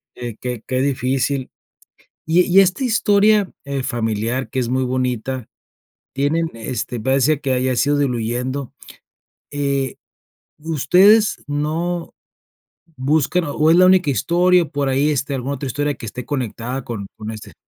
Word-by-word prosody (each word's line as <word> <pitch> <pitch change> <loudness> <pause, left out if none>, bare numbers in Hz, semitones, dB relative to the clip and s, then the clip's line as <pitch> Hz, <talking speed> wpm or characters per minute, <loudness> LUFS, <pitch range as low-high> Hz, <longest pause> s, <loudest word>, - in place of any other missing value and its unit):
qué 120 -3 -6
qué 125 -3 -4
qué 130 0 0
difícil. 130 0 -1 0.8
Y 165 +3 +4
e - - 0
y 190 +2 +6
esta 190 +7 +1
historia, 210 -3 +3
eh, 140 -1 -3
familiar 115 +1 -2
que 130 - -6
es 125 - -1
muy 130 +1 +1
bonita, 125 -1 -2 0.7
tienen, 160 +4 0
este, 115 +1 -4
parece 135 +4 +2
que 130 -3 0
ya 130 -1 +1
se 140 - +2
ha - - +3
ido 145 - +1
diluyendo, 125 +1 -2 0.8
eh, 140 -2 -1 0.6
¿ustedes 180 - +4
no 165 +4 -2 0.8
buscan 155 +6 +1
o 155 +1 +3
es 170 - +5
la 185 - +7
única 185 -5 +4
historia 175 +4 +3
por 145 -2 -2
ahí 135 +3 +2
esté 140 0 -1
alguna 135 +2 -3
otra 140 +1 -5
historia 145 +3 -1
que 115 - -9
esté 125 +3 -7
conectada 125 -1 -4
con 110 -4 -5
con 110 0 -6
este? 110 -1 -10
135 Hz, 155 wpm, -20 LUFS, 125-160 Hz, 0.8 s, la